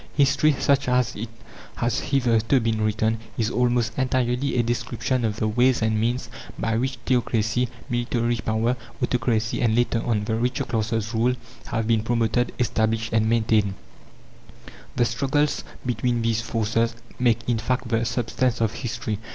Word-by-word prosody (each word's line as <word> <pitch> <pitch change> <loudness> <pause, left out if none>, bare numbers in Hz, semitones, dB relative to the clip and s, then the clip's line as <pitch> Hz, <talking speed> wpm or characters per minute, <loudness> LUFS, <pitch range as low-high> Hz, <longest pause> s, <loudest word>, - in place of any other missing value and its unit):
History, 145 +1 +4
such 140 -1 +2
as 125 -1 +1
it 110 +2 -5 0.5
has 120 0 0
hitherto 120 -1 +2
been 110 -2 0
written, 110 +1 +1 0.2
is 110 0 0
almost 120 -2 +1
entirely 130 +1 0
a 120 - +3
description 120 +1 -1
of 110 -2 0
the 110 - -1
ways 120 +2 +3
and 110 -1 +1
means 120 +3 0 0.3
by 115 0 0
which 130 +3 -1
theocracy, 120 -1 +1 0.2
military 120 -1 0
power, 115 +3 0 0.2
autocracy, 115 -2 0
and, 110 -2 +2
later 120 -1 +1
on, 110 -3 0
the 110 - -2
richer 125 +3 0
classes' 110 -1 -1
rule 120 +3 +2 0.3
have 115 -1 -1
been 115 -1 +2
promoted, 115 +1 +1
established, 110 -2 0
and 110 0 +3
maintained. 110 -3 +2 1.2
The 120 - +3
struggles 140 +6 0 0.2
between 120 -1 0
these 115 -1 +1
forces 115 0 0 0.2
make, 120 -2 +2
in 120 -2 +1
fact, 125 +2 -1
the 115 0 +1
substance 120 +1 0
of 110 -2 +1
history. 110 -3 -4
115 Hz, 150 wpm, -24 LUFS, 110-125 Hz, 1.2 s, History